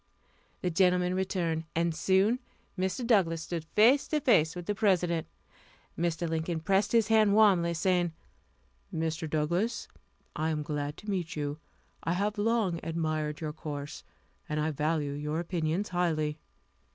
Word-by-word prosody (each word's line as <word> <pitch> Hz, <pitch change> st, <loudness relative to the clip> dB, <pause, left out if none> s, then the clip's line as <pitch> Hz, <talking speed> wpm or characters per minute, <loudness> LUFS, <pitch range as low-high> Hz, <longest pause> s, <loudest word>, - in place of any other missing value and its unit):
The 180 Hz, -, +1 dB
gentleman 180 Hz, +1 st, +3 dB
returned, 175 Hz, -4 st, -1 dB
and 170 Hz, 0 st, +1 dB
soon 190 Hz, +8 st, +2 dB, 0.4 s
Mr. 190 Hz, +6 st, -2 dB
Douglass 175 Hz, -8 st, +2 dB
stood 170 Hz, -2 st, -4 dB
face 245 Hz, +7 st, +5 dB
to 305 Hz, -, +1 dB
face 180 Hz, -, +3 dB
with 175 Hz, -1 st, -6 dB
the 205 Hz, -, 0 dB
President. 180 Hz, -6 st, +1 dB, 0.7 s
Mr. 170 Hz, 0 st, -1 dB
Lincoln 160 Hz, +1 st, -2 dB
pressed 195 Hz, +5 st, +1 dB
his 230 Hz, -2 st, +3 dB
hand 215 Hz, -2 st, +5 dB
warmly, 185 Hz, -6 st, +4 dB
saying: 175 Hz, 0 st, +1 dB, 0.8 s
"Mr. 160 Hz, 0 st, -2 dB
Douglass, 170 Hz, +10 st, 0 dB, 0.5 s
I 155 Hz, +1 st, 0 dB
am 155 Hz, -1 st, -1 dB
glad 145 Hz, 0 st, -3 dB
to 210 Hz, -, -9 dB
meet 180 Hz, -4 st, -2 dB
you. 145 Hz, 0 st, -3 dB, 0.4 s
I 165 Hz, -, 0 dB
have 205 Hz, +3 st, -1 dB
long 210 Hz, -6 st, +1 dB
admired 155 Hz, -2 st, -2 dB
your 155 Hz, -1 st, -3 dB
course, 145 Hz, -2 st, -6 dB, 0.5 s
and 150 Hz, 0 st, -1 dB
I 155 Hz, +1 st, 0 dB
value 150 Hz, 0 st, -1 dB
your 150 Hz, +2 st, -3 dB
opinions 170 Hz, +2 st, -1 dB
highly." 155 Hz, -4 st, 0 dB
170 Hz, 145 wpm, -30 LUFS, 155-195 Hz, 0.8 s, face